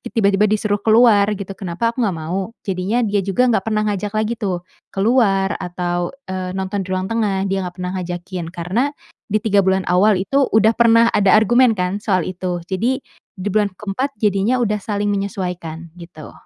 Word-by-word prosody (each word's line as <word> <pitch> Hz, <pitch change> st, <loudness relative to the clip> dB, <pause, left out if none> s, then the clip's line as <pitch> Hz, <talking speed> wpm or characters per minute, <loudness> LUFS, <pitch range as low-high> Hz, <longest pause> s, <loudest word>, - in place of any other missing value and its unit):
tiba-tiba 200 Hz, -2 st, +3 dB
disuruh 210 Hz, -1 st, 0 dB
keluar, 220 Hz, -2 st, +5 dB
gitu. 200 Hz, -1 st, -6 dB
Kenapa 195 Hz, +4 st, -2 dB
aku 250 Hz, -, 0 dB
enggak 195 Hz, -6 st, -1 dB
mau, 185 Hz, +6 st, -3 dB, 0.2 s
jadinya 195 Hz, +5 st, 0 dB
dia 205 Hz, -2 st, +1 dB
juga 200 Hz, +7 st, +1 dB
enggak 220 Hz, -5 st, +2 dB
pernah 215 Hz, -1 st, +1 dB
ngajak 205 Hz, 0 st, -2 dB
lagi 215 Hz, +1 st, 0 dB
tuh 185 Hz, -5 st, -2 dB, 0.3 s
keluar 200 Hz, -2 st, +2 dB
atau, 175 Hz, 0 st, -3 dB, 0.2 s
eee, 185 Hz, -1 st, -4 dB
nonton 190 Hz, +1 st, -2 dB
di 185 Hz, -, -11 dB
ruang 185 Hz, 0 st, -1 dB
tengah, 200 Hz, -4 st, 0 dB
dia 195 Hz, 0 st, -1 dB
enggak 180 Hz, -1 st, -6 dB
pernah 180 Hz, 0 st, -3 dB
ngajakin 175 Hz, 0 st, -5 dB
karena 180 Hz, +7 st, -1 dB, 0.5 s
di 215 Hz, -, +2 dB
3 205 Hz, -2 st, +3 dB
bulan 190 Hz, 0 st, +1 dB
awal 185 Hz, +2 st, +3 dB
itu 270 Hz, +7 st, +1 dB
udah 220 Hz, +1 st, +4 dB
pernah 230 Hz, -1 st, +5 dB
ada 195 Hz, -2 st, +4 dB
argumen 240 Hz, +3 st, +5 dB
kan 180 Hz, +3 st, -1 dB
soal 185 Hz, -4 st, +1 dB
itu. 180 Hz, -1 st, -3 dB
Jadi 235 Hz, +9 st, 0 dB, 0.4 s
di 185 Hz, -, -3 dB
bulan 205 Hz, 0 st, +1 dB
ke-4 210 Hz, +8 st, -3 dB
jadinya 210 Hz, +4 st, +1 dB
udah 210 Hz, -3 st, 0 dB
saling 205 Hz, 0 st, -2 dB
menyesuaikan, 180 Hz, -5 st, -4 dB
gitu. 160 Hz, -3 st, -11 dB
195 Hz, 180 wpm, -19 LUFS, 185-215 Hz, 0.5 s, keluar